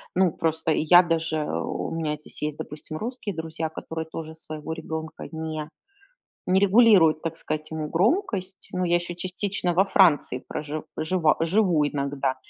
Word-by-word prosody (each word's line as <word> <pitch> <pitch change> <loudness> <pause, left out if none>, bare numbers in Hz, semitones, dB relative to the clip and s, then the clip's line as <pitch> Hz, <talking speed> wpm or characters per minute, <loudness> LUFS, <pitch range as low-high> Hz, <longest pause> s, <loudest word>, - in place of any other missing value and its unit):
Ну, 185 -2 +4
просто 160 0 -1
я 175 +4 +6
даже, 165 -1 0
э, 150 - -2
у - - -3
меня 160 -2 -1
здесь 150 - -14
есть, 150 0 -2
допустим, 150 +1 -7
русские 220 -2 -4
друзья, 160 0 -4
которые 160 0 -6
тоже 160 -1 -6
своего 155 0 -7
ребёнка 160 0 -6
не 155 -1 -4 0.8
не 185 +1 +3
регулируют, 195 -6 +6
так 165 0 -3
сказать, 155 -1 -4
ему 155 -1 -3
громкость. 195 - 0
Но 180 0 0
я 175 0 +3
ещё 175 0 -3
частично 185 +1 -2
во 190 +3 +5
Франции 160 -10 +3
прожив 150 +1 -5
жива, 160 0 +2
живу 165 -3 +3
иногда. 140 -2 -1
160 Hz, 160 wpm, -25 LUFS, 155-185 Hz, 0.8 s, я